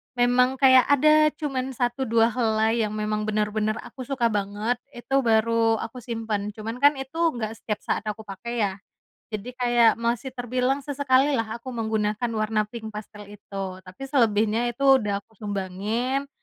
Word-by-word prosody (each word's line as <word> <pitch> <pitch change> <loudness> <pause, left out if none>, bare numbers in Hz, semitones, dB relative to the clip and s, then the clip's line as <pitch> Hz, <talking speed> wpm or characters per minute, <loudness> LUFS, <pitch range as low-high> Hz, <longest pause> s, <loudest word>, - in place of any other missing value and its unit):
memang 245 +1 +3
kayak 260 -2 +6
ada 305 +2 +5
cuman 265 -4 -3
1 245 +2 -1
2 230 0 +3
helai 220 -1 +1
yang 215 -1 -1
memang 215 0 -2
bener-bener 215 0 0
aku 255 -3 -9
suka 240 -5 +1
banget, 210 +4 -1 0.2
itu 270 +3 0
baru 225 -1 +3
aku 225 +3 -6
simpen. 220 -3 -4
Cuman 225 +3 -6
kan 285 +1 +5
itu 270 +4 -7 0.2
nggak 220 -2 -3
setiap 210 -2 -3
saat - - -1
aku 215 +1 -4
pakai 220 +4 -4
ya? 200 - +1 0.6
Jadi 240 +4 -6
kayak 240 -2 +4
masih 235 +2 -1
terbilang 255 +2 -1
sesekali 280 0 +2
lah 225 -3 -1
aku 255 +2 -8
menggunakan 220 0 -1
warna 215 -1 0
pink 220 -1 -8
pastel 210 0 -9
itu. 195 -2 -7
Tapi 185 +6 -13
selebihnya 230 -3 +2
itu 270 +2 +4
udah 205 -2 -1
aku - - -31
sumbangin 210 +7 -2
230 Hz, 160 wpm, -25 LUFS, 215-255 Hz, 0.6 s, kayak